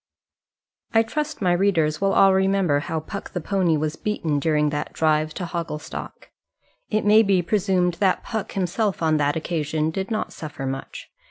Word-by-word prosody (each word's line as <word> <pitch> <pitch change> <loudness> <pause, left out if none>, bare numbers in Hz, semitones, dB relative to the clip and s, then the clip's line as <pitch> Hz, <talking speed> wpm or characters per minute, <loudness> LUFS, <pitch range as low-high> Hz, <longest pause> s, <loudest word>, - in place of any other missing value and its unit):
I 225 - +6
trust 300 +2 -3
my 180 - +3
readers 170 -5 +1
will 195 0 +2
all 195 -1 +6
remember 190 -5 +2
how 160 +2 -3
Puck 200 +5 -7
the 180 - -1
pony 180 -2 +1
was 155 +1 -2
beaten 165 -9 -1
during 150 -1 +1
that 150 0 -3
drive 155 -1 +1
to 180 - -3
Hogglestock. 165 -3 -6 0.6
It 215 -1 0
may 215 +1 +7
be 195 -4 +2
presumed 185 -2 +1
that 190 -2 +2
Puck 220 -3 -4
himself 195 0 -1
on 155 -1 +3
that 145 0 +1
occasion 160 -1 -1
did 190 +3 -4
not 220 -2 -2
suffer 150 -3 -7
much. 135 0 -6
175 Hz, 170 wpm, -23 LUFS, 155-195 Hz, 0.6 s, may